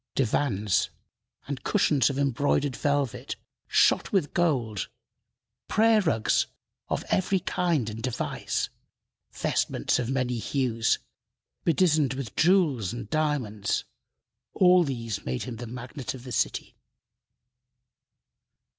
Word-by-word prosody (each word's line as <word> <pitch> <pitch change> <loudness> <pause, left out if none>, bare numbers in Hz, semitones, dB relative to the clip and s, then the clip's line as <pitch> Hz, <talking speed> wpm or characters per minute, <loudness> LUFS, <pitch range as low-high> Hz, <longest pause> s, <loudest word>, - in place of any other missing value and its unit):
Divans 110 -6 +1 0.6
and 140 -2 -5
cushions 145 - +3
of 140 - -3
embroidered 140 0 +1
velvet 145 -5 -1 0.3
shot - - +3
with 185 -8 +1
gold, 125 - 0 0.8
prayer 220 0 +4
rugs 115 - +2 0.4
of - - -1
every 190 0 +2
kind 170 - 0
and 110 0 -5
device, 125 0 -2 0.6
vestments - - 0
of 120 -1 -2
many 130 -3 0
hues, 115 -2 +1 0.7
bedizened 155 -6 +3
with 130 -7 -6
jewels 155 - +3
and 120 - -7
diamonds 135 -10 0 0.7
all 180 -1 +6
these 115 - -3
made 65 0 -3
him 120 -3 -6
the 120 - -6
magnate 125 +3 -6
of 125 - -11
the 125 - -8
city. - - -1
135 Hz, 110 wpm, -27 LUFS, 115-155 Hz, 0.8 s, all